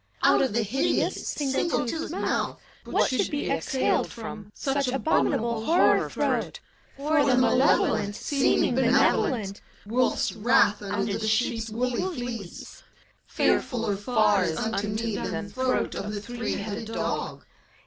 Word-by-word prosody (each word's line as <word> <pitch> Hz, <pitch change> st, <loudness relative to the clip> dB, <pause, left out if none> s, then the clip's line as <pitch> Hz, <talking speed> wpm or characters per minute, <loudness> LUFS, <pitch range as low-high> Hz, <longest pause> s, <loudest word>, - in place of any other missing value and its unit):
Out -, -, +5 dB
of 265 Hz, -5 st, 0 dB
the 230 Hz, 0 st, +1 dB
hideous, 240 Hz, +7 st, 0 dB
single 280 Hz, +1 st, 0 dB
toothed 320 Hz, +7 st, -3 dB
Mouth, -, -, -2 dB, 0.3 s
what -, -, +2 dB
should 255 Hz, -, 0 dB
be 290 Hz, -, -2 dB
exhaled 265 Hz, -, 0 dB
from 215 Hz, -2 st, -8 dB
Such 275 Hz, -1 st, -1 dB
abominable 235 Hz, -4 st, 0 dB
horror 340 Hz, +9 st, +3 dB
throat! -, -, -1 dB, 0.4 s
For 300 Hz, +2 st, +1 dB
th^ 260 Hz, -3 st, +4 dB
Malevolent, 250 Hz, -5 st, +2 dB
seeming 275 Hz, -2 st, +1 dB
benevolent, 245 Hz, -5 st, +2 dB
— -, -, -28 dB
Wolf's 245 Hz, +4 st, +1 dB
wrath 210 Hz, -2 st, +3 dB
under 200 Hz, 0 st, -2 dB
the 220 Hz, -, -2 dB
sheep's 225 Hz, 0 st, 0 dB
woolly 245 Hz, +2 st, -1 dB, 0.2 s
fleece, 230 Hz, -7 st, -7 dB, 0.3 s
— -, -, -38 dB
Fearf -, -, +1 dB
uller 225 Hz, -4 st, -1 dB
far 205 Hz, -2 st, +2 dB
is 160 Hz, -2 st, -2 dB
unto 210 Hz, -2 st, -1 dB
me 215 Hz, 0 st, -2 dB
than 210 Hz, -2 st, -4 dB
Throat 255 Hz, +2 st, 0 dB
of 205 Hz, +1 st, -4 dB
the -, -, -3 dB
three 240 Hz, +1 st, -4 dB
headed 210 Hz, +2 st, -5 dB
dog. 225 Hz, -, -3 dB
230 Hz, 145 wpm, -26 LUFS, 210-260 Hz, 0.4 s, Out